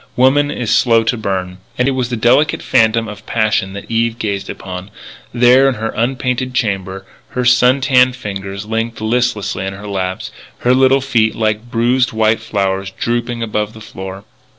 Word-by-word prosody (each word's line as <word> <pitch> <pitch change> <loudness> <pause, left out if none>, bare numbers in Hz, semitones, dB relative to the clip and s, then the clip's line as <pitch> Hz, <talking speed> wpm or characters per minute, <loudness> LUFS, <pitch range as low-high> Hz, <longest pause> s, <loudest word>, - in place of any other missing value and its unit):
Woman 140 +3 +3
is 120 -6 -1
slow 115 -2 +4
to 115 - 0
burn. 95 -4 -3 0.2
And 125 - +2
it - - +3
was 130 -2 -1
the 125 - -2
delicate 120 +7 +2
phantom 115 0 +2
of 105 -1 -9
passion 105 -4 0
that 100 - -7
Eve 115 0 0
gazed 100 -4 -3
upon, 90 +1 -7 0.4
there 125 +3 +5
in 130 - -2
her 110 0 -3
unpainted 125 +1 -1
chamber, 95 -4 -2 0.3
her 125 - 0
sun 125 +2 +4
tanned 125 -2 +4
fingers 100 -4 -6
linked 115 +1 -3
listlessly 110 -4 -1
in 95 0 -3
her 100 +2 -10
lap, 95 -2 -3 0.4
her 125 - +3
little 135 +1 +4
feet 115 -5 +1
like 110 +1 -1
bruised 125 +2 +1
white 110 0 +2
flowers 95 -1 -2
drooping 120 +3 -2
above 105 -1 -2
the 110 - -12
floor. 95 -2 -8
115 Hz, 175 wpm, -16 LUFS, 100-125 Hz, 0.4 s, there